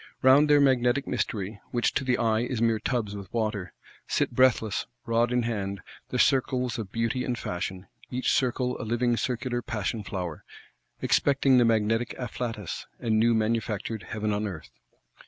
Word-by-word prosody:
Round 140 +3 +6
their 145 0 +6
Magnetic 130 -1 +3
Mystery, 105 -4 -3
which 120 -1 +1
to - - 0
the 125 -2 +1
eye 110 -2 +2
is 120 0 -2
mere 115 -1 +2
tubs 110 -3 -2
with 100 -3 -8
water,—sit 105 -6 -3
breathless, 120 -4 +2 0.2
rod 115 +1 +2
in 125 -1 +2
hand, 100 -4 -3 0.3
the - - -2
circles 125 -2 +2
of 100 -4 -6
Beauty 115 +3 -1
and 125 -1 -2
Fashion, 90 -1 -4 0.2
each 130 0 0
circle 125 -1 0
a - - -4
living 120 +2 +1
circular 120 0 -2
Passion 110 0 -3
Flower: 90 -5 -5 0.6
expecting 135 -2 +4
the 120 - +5
magnetic 115 +1 +1
afflatus, 115 -6 -5
and 110 -2 +1
new 115 +1 +4
manufactured 110 -1 -1
Heaven 105 -1 -1
on 105 +1 -1
Earth. 85 -10 -8
115 Hz, 155 wpm, -27 LUFS, 105-125 Hz, 0.6 s, Round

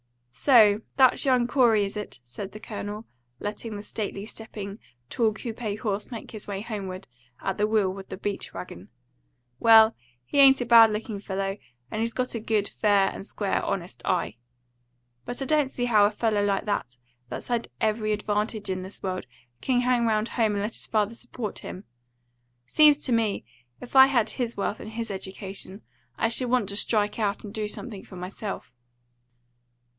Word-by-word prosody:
"So 215 - +5 0.2
that's 260 0 +5
young 255 -3 +4
Corey, 240 -5 +4
is 195 - -6
it?" 210 -11 -6
said 160 +12 -8
the 215 - -8
Colonel, 210 0 -6 0.3
letting 210 +1 -4
the 205 - -6
stately 205 -2 -4
stepping, 210 -2 -7 0.3
tall 230 -3 +2
coupe 220 +1 -7 0.2
horse 205 -3 -2
make 230 -4 -8
his 215 -2 -7
way 200 -1 -3
homeward 195 -4 -6 0.3
at 205 +2 0
will 205 -4 +2
with 195 0 -10
the - - -6
beach 200 +1 -4
wagon. 90 +1 -9 0.7
"Well, 225 -1 +7 0.3
he 280 - 0
ain't 270 -1 +8
a 245 - -1
bad 230 -1 +8
looking 210 -1 -4
fellow, 195 0 -3 0.3
and 215 - -2
he's 230 0 -1
got 255 -1 -1
a 230 - -2
good, 215 -2 0
fair 205 -2 +3
and - - -7
square, 200 0 -1
honest 180 -1 -4
eye. 170 - -1 0.9
But 245 0 -5
I - - -3
don't 295 -1 +2
see 245 -2 -2
how 215 -4 +5
a - - +4
fellow 215 -1 0
like 200 0 0
that, 125 - -2 0.3
that's 125 - -7
had 235 -1 0
every 215 0 0
advantage 210 0 -1
in 185 0 -2
this 190 +2 -9
world, 185 -8 -3 0.3
can 250 -2 +2
hang 245 -1 +2
round 215 0 +1
home 220 -3 +1
and 200 0 -1
let 210 - -2
his - - -3
father 215 0 +1
support 235 -2 -5
him. 185 - -8 0.8
Seems 295 - +6
to 260 - -1
me, 225 -3 +1 0.3
if 250 - -11
I 265 0 +10
had 240 -5 +1
his 240 -2 -3
health 200 +1 -2
and 215 - -8
his 225 -1 -3
education, 195 +1 -7 0.3
I 225 - +2
should 245 +2 +1
want 245 -5 +2
to 200 - -2
strike 210 0 +1
out 205 -2 -1
and 205 -2 -8
do 215 -2 -2
something 210 -1 -4
for 190 - -12
myself." 185 - -6
215 Hz, 180 wpm, -26 LUFS, 200-230 Hz, 0.9 s, I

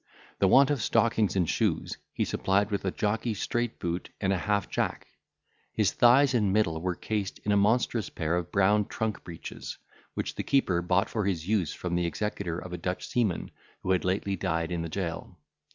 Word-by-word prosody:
The 95 - +4
want 135 +8 +6
of 140 -5 0
stockings 110 -2 +2
and 90 -3 +2
shoes - - 0
he - - -1
supplied 100 +2 +1
with 100 -1 -2
a - - +2
jockey 110 +3 -1
straight 120 +3 -2
boot 85 +1 -3
and 95 -1 +1
an 95 - 0
half 100 +2 0
jack. - - -2 0.7
His - - +2
thighs 130 +3 +5
and 105 -5 +2
middle 85 -6 +1
were 90 0 -1
cased 105 -1 -3
in 105 - 0
a - - +4
monstrous 110 0 +2
pair 80 +1 -1
of 90 -1 -3
brown 100 +2 +3
trunk 110 -1 -3
breeches, 85 -2 -7 0.4
which - - -2
the - - -3
keeper 95 -11 +2
bought 90 +2 +2
for 110 -3 -2
his 85 -4 -2
use 100 -7 +1
from 90 -1 -4
the 85 0 +1
executor 100 -2 -3
of 90 0 -7
a 90 - -4
Dutch 90 +2 -3
seaman 115 -8 0 0.3
who 95 - 0
had 95 - +2
lately 95 +1 0
died 80 -1 -1
in 85 -1 -1
the 85 - -4
jail. 85 -1 -4
95 Hz, 200 wpm, -28 LUFS, 90-110 Hz, 0.7 s, want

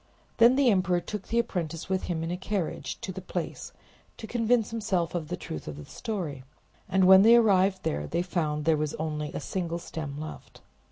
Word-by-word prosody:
Then 235 +2 +7
the 270 -3 +4
emperor 185 -2 +2
took 205 +3 -6
the 230 - -1
apprentice 170 -8 -2
with 190 0 -1
him 165 -2 -2
in 165 - -3
a - - -1
carriage 180 -7 -3
to 190 - -4
the 190 +1 -7
place, 180 -1 -5 0.5
to - - -7
convince 230 -1 +1
himself 200 -7 -1
of 170 -3 -3
the 180 +3 -4
truth 75 - -7
of 75 -1 -6
the 75 - -9
story; 175 - -5 0.5
and 190 0 +3
when 190 +1 +9
they 225 +3 +8
arrived 195 -4 +4
there 75 +1 -2
they 170 - -1
found 155 -5 -2
there 165 -1 +4
was 150 0 -2
only 150 -1 -3
a - - -4
single 170 -3 -3
stem 155 -4 -6
left. 155 0 -9
180 Hz, 205 wpm, -28 LUFS, 155-205 Hz, 0.5 s, when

